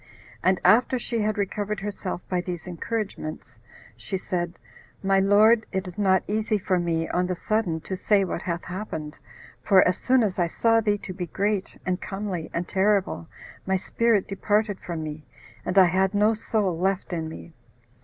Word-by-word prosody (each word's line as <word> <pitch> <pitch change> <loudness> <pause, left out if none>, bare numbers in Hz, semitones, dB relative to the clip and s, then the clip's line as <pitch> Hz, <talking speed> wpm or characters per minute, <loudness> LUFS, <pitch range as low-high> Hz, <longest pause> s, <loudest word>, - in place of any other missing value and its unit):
And 185 +1 +3
after 250 +3 +5
she 235 -1 -3
had 215 0 0
recovered 205 +1 -2
herself 195 -3 -5
by 180 -1 0
these 175 -2 -5
encouragements, 175 - -5 0.4
she 115 - -4
said, 175 -2 -3 0.5
"My 195 0 +3
lord, 215 +3 +5
it 190 -1 -2
is 180 - -8
not 190 -2 +3
easy 215 +1 0
for 185 -2 0
me, 165 -1 0
on 180 0 0
the 180 - -1
sudden, 180 -5 -1
to 190 - -4
say 200 +1 +3
what 175 - -3
hath 170 -2 -3
happened, 175 -5 -6 0.4
for 190 -2 +5
as 180 - 0
soon 255 -1 +3
as 195 -3 -1
I 175 - +3
saw 225 +6 +3
thee 210 -1 +1
to 200 -2 -7
be 180 -1 -4
great, 200 +2 -1
and 185 0 -1
comely, 195 -4 -4
and 170 +1 -3
terrible, 195 - +1 0.4
my 190 - +2
spirit 225 +2 +1
departed 205 +1 0
from 165 -3 -5
me, 155 0 -6 0.4
and 180 - -2
I 190 - +9
had 190 +3 +1
no 210 +2 +4
soul 210 -5 -1
left 190 0 0
in 160 -2 -2
me." 160 +1 -10
190 Hz, 180 wpm, -25 LUFS, 175-210 Hz, 0.5 s, I